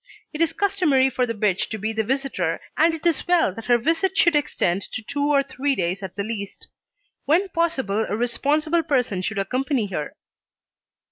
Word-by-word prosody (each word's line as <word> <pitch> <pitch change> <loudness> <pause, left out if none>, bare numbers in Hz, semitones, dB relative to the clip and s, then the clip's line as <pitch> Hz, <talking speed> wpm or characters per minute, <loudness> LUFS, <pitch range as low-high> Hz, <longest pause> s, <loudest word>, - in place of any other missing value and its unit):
It 305 - -4
is 330 -1 +3
customary 330 -9 +2
for 250 0 0
the 230 - -3
bitch 200 -3 0
to 220 - -4
be 220 +2 -3
the 220 0 0
visitor, 250 -9 -1 0.2
and 325 +1 +3
it 320 - -10
is 335 -2 +1
well 345 - +3
that 225 +3 -9
her 240 -1 +4
visit 330 +9 0
should 340 -3 +4
extend 195 -10 0
to 220 - -4
two 285 +5 -1
or 280 -1 +4
three 275 +1 -1
days 180 0 -2
at 190 -2 -7
the 200 - -2
least. 205 -2 -6 0.6
When 355 +7 +2
possible 265 - 0
a 210 - -1
responsible 295 +8 +1
person 250 - 0
should 205 +3 -3
accompany 255 +4 0
her. 150 -5 -4
260 Hz, 190 wpm, -23 LUFS, 210-315 Hz, 0.6 s, her